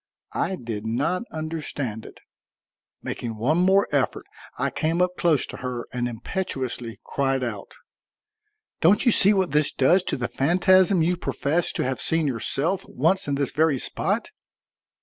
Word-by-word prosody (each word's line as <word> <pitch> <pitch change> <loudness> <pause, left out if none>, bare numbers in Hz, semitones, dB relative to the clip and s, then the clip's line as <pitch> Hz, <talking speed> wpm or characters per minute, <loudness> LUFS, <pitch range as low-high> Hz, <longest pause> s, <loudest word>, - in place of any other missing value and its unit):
I 190 - -1
did 115 - -6
not 135 +11 -1
understand 150 -8 -5
it. - - -15 0.8
Making 115 -2 -5
one 145 +10 +1
more 190 +2 +4
effort - - 0 0.3
I - - -1
came 165 +2 -1
up 180 0 +2
close 165 -6 +2
to - - -9
her 125 -2 -5
and 120 -1 -1
impetuously 120 - -4
cried 135 -2 -1
out: 105 -5 -6 1.0
"Don't 190 +10 +4
you 240 - +6
see 200 -1 +6
what 190 -4 +1
this 150 0 +2
does 175 +8 +3
to - - 0
the 125 -1 -2
phantasm 185 +4 +3
you 175 +2 +1
professed 165 0 -1
to - - 0
have 130 0 -2
seen 165 -1 +1
yourself 145 - -1
once 165 +8 +1
in 140 - 0
this 140 -2 0
very 155 -2 +2
spot? - - -2
150 Hz, 155 wpm, -24 LUFS, 125-180 Hz, 1.0 s, you